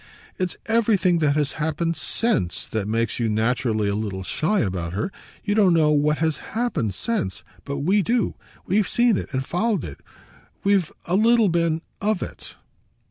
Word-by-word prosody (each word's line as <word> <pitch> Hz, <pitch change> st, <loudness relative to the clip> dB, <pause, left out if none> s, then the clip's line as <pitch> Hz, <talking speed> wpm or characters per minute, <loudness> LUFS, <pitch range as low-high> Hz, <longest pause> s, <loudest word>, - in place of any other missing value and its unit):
"It's 185 Hz, -1 st, -2 dB
everything 210 Hz, -6 st, +3 dB
that 145 Hz, -2 st, +2 dB
has 150 Hz, -2 st, +1 dB
happened 160 Hz, +2 st, -1 dB
SINCE 190 Hz, -, -1 dB
that 110 Hz, -3 st, -2 dB
makes 115 Hz, +2 st, -1 dB
you 115 Hz, -2 st, +1 dB
naturally 110 Hz, 0 st, +1 dB
a 100 Hz, -, 0 dB
little 100 Hz, -3 st, -3 dB
shy 170 Hz, -, 0 dB
about 90 Hz, -4 st, -2 dB
her. 110 Hz, -, -2 dB, 0.3 s
You 205 Hz, -, 0 dB
don't 200 Hz, -5 st, +4 dB
know 155 Hz, -2 st, +4 dB
what 150 Hz, 0 st, +2 dB
has 160 Hz, -2 st, 0 dB, 0.2 s
happened 125 Hz, -, 0 dB
since, 155 Hz, -, -2 dB, 0.2 s
but 140 Hz, 0 st, -3 dB
we 195 Hz, +7 st, +3 dB
do; 235 Hz, +4 st, +1 dB, 0.3 s
we've 200 Hz, +2 st, +2 dB
seen 240 Hz, -2 st, +3 dB
it -, -, -4 dB
and 130 Hz, -1 st, -2 dB
followed 195 Hz, -, 0 dB
it; 70 Hz, -, -8 dB, 0.6 s
we've 195 Hz, -5 st, +2 dB
a 175 Hz, -, 0 dB
little 225 Hz, 0 st, +4 dB
been 165 Hz, -1 st, +1 dB, 0.2 s
OF 210 Hz, -2 st, 0 dB
it." -, -, -9 dB
160 Hz, 170 wpm, -23 LUFS, -, 0.6 s, don't